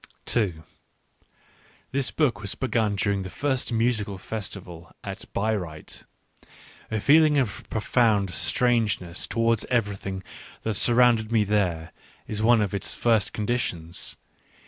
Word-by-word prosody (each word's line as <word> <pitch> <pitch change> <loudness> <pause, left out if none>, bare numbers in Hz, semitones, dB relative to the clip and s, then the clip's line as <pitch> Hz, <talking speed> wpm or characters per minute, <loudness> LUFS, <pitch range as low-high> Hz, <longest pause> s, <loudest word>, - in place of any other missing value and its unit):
This 135 -1 0
book 125 -9 +1
was 100 -1 -3
begun 115 -5 0
during 100 0 0
the 95 - -5
first 135 +2 -1
musical 115 -4 0
fes 105 +1 -5
tival 85 -3 -11
at - - -8
Bayreuth; 95 -8 -3 0.8
a 110 - -1
feeling 150 +4 +5
of 125 -7 -1
profound 110 -3 +2
strange 115 +4 +1
ness 85 0 -6
towards 115 -1 +1
everything 100 -5 -2 0.4
that 110 - 0
surrounded 115 0 +4
me 110 -2 +4
there, 90 -6 0 0.3
is 105 0 -3
one 115 0 +5
of 100 -2 -1
its 100 -1 -2
first 115 -3 +2
conditions. 105 -7 -3
110 Hz, 125 wpm, -25 LUFS, 100-120 Hz, 0.8 s, feeling